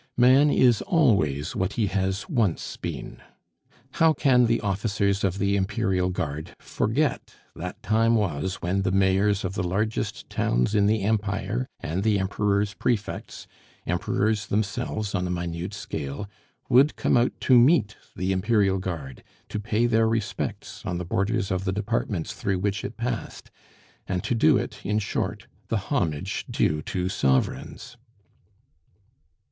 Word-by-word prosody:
Man 130 +4 +6
is 125 -5 +4
always 100 - +2
what 95 +1 -1
he 110 - +1
has 95 - -1
once 115 - 0
been. - - -6 0.7
How 160 +1 +4
can 125 -5 +4
the 115 0 +2
officers 100 0 0
of 95 -1 0
the 100 0 +1
Imperial 95 -2 0
Guard 80 -4 -4
forget 135 +6 -1 0.2
that 90 +2 -7
time 115 +3 +3
was 95 -3 -1
when 95 +3 0
the 95 - 0
mayors 95 +1 +2
of 95 - -3
the 95 - -2
largest 100 +5 -2
towns 60 - 0
in 100 -1 +3
the 110 -1 +1
Empire 100 - -1
and 85 +5 -2
the 105 0 +2
Emperor's 100 +1 0
prefects, 110 -4 -3 0.4
Emperors 105 -1 0
themselves 105 0 -2
on 90 -2 0
a - - -4
minute 85 0 -3
scale, 70 +9 -5 0.4
would 135 +5 +5
come - - +1
out 120 0 +1
to 125 -2 +6
meet 120 -5 +4 0.2
the 95 +1 -1
Imperial 95 0 +2
Guard, 80 -9 -6 0.3
to 105 - -3
pay 110 +2 0
their 115 -1 +3
respects 115 -2 -3
on 90 -2 -3
the 90 - -4
borders 100 +4 0
of 95 0 -1
the 95 - 0
Departments 105 -3 -2
through 100 -5 -1
which 100 +2 -1
it 110 - -6
passed, 120 +1 -4 0.6
and 90 -2 -2
to - - -1
do 110 -9 +4
it, - - -5
in 105 +1 0
short, 105 - -2 0.2
the - - 0
homage 75 -4 -2
due 75 0 +1
to 90 +4 -2
sovereigns? 70 - -1
100 Hz, 150 wpm, -25 LUFS, 95-110 Hz, 0.7 s, Man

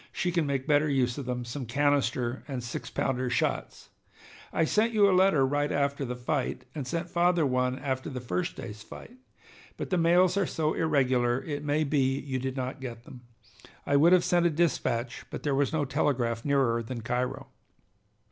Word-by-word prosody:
She 175 - -1
can 170 -4 0
make 135 -2 -1
better 150 0 +3
use 130 -1 +1
of 135 - -6
them, 125 -1 -3
some 120 +1 -6
canister 130 -2 0
and 130 -4 -4
six 120 - -5
pounder 130 -1 -1
shots. 120 - -2 0.6
I 165 - +2
sent 220 +7 +1
you 205 -2 +5
a 195 - +3
letter 185 -7 +4
right 145 +2 0
after 140 0 0
the 125 0 -4
fight, 125 0 -2
and 140 -4 -5
sent 170 +3 -2
father 175 -1 +2
one 125 -1 0
after 130 +1 -3
the 130 -3 -5
first 90 -7 -3
day's 105 -2 -8
fight. 235 - -12 0.6
But - - -5
the 180 - +2
mails 175 +3 +4
are 195 -4 +2
so 155 -1 -1
irregular 130 -5 +1
it 145 -1 -4
may 150 +1 +1
be 135 -2 +1
you 135 -2 -3
did 130 +1 -4
not 130 +2 -4
get 120 -3 -7
them. 125 0 -12 0.6
I 140 - +1
would 160 +5 +6
have 180 -1 +5
sent 175 -1 +3
a - - +2
dispatch, 140 -7 -1
but - - -7
there 145 - 0
was 140 0 +1
no 155 -3 0
telegraph 125 -5 0
nearer 135 -5 +2
than 115 +1 -6
Cairo. 125 +3 -3
140 Hz, 195 wpm, -28 LUFS, 125-155 Hz, 0.6 s, would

